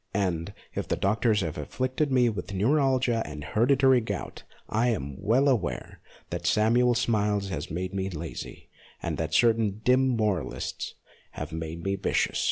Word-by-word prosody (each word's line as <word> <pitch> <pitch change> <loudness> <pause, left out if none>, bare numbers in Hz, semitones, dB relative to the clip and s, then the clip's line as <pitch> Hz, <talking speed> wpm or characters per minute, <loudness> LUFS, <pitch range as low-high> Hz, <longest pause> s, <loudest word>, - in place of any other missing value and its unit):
And, 90 -5 -1 0.2
if - - -3
the - - +1
doctors 110 +2 +2
have 80 -3 -3
afflicted 130 - -1
me 125 -2 +4
with 100 -3 -3
neuralgia 130 +1 +2
and 75 -1 -7
hereditary 130 - +4
gout, 110 - -5 0.3
I 115 +3 +1
am 70 - -2
well 120 +7 +3
aware 115 -11 -1 0.3
that - - -3
Samuel 120 +3 +4
Smiles 105 -4 +1
has 75 -6 -4
made 90 +4 -3
me 95 0 -2
lazy, 85 -3 -7 0.3
and - - -2
that 80 0 -1
certain 110 -2 +3
dim 130 +1 +4
moralists 105 - -2 0.4
have - - -6
made 80 +1 -5
me 100 0 -1
vicious. - - 0
105 Hz, 155 wpm, -27 LUFS, 90-125 Hz, 0.4 s, me